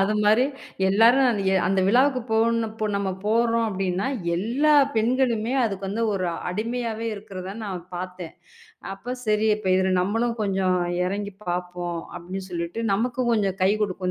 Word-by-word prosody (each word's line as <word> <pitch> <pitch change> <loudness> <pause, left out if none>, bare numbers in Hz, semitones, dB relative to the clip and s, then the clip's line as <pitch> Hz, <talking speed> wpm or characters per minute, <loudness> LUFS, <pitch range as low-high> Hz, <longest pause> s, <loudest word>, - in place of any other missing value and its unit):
அது 210 +2 +1
மாரி 215 +4 +5 0.4
எல்லாரும் 230 +7 +5
அது 210 -4 -1
ய - - +2
அந்த 190 +1 +2
விழாவுக்குப் 255 +2 +3
போணு 230 +1 +2
இப்ப 215 0 -4
நம்ம 200 -1 -1
போறோம் 230 +1 +2
அப்பிடின்னா, 190 -1 -1 0.3
எல்லா 250 - +2 0.2
பெண்களுமே 235 0 +1
அதுக்கு 195 -3 -3
வந்து 210 +4 -2
ஒரு 185 -2 -1 0.2
அடிமையாவே 230 +3 -3
இருக்கறத 195 -2 -7
நான் 185 -4 -5
பார்த்தேன். 180 -2 -6 0.6
அப்பச் 245 +5 -7
சரி. 215 0 +2
இப்ப 205 -3 -4
இது 190 0 +2
நம்மளும் 225 +5 0
கொஞ்சம் 190 -2 +1 0.3
இறங்கி 200 +2 -3
பாப்போம். 175 -1 -3 0.2
அப்பிடின்னு 185 +2 -6
சொல்லிட்டு. 170 +5 -4
நமக்கும் 240 +3 0
கொஞ்சம் 200 -4 +1
கைக்கு 205 +3 +3
கொடுக்கும். 185 -2 -2
205 Hz, 150 wpm, -24 LUFS, 190-230 Hz, 0.6 s, மாரி